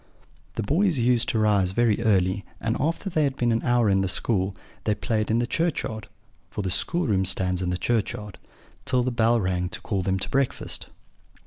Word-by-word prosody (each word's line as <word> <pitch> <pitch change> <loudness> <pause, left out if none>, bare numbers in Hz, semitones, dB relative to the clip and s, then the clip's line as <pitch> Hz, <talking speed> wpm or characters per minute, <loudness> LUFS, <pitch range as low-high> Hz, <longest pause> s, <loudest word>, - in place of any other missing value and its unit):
"The - - -2
boys 165 - +2
used 120 0 +2
to 115 - 0
rise 100 -4 +2
very 115 0 +2
early, 95 -3 +2 0.2
and, 115 0 -1
after 165 +7 -1
they 160 -5 +1
had 140 -1 -1
been 120 -1 +1
an 115 - +1
hour 120 -2 +2
in 95 -1 +3
school, 95 0 0 0.3
they 105 - +2
played 105 +2 -1
in 110 - +2
the 120 - +1
churchyard 125 - -2 0.4
(for 105 - -4
the 95 - -2
schoolroom 105 - 0
stands 90 -1 +1
in 90 - -1
the 90 - -1
churchyard) 105 -1 -2 0.4
till 125 -1 +1
the 130 - -1
bell 115 0 +3
rang 90 -2 -1
to 110 - -6
call 100 -4 -2
them 95 +1 0
to 95 - -3
breakfast. 135 -2 -1
110 Hz, 195 wpm, -25 LUFS, 95-120 Hz, 0.4 s, in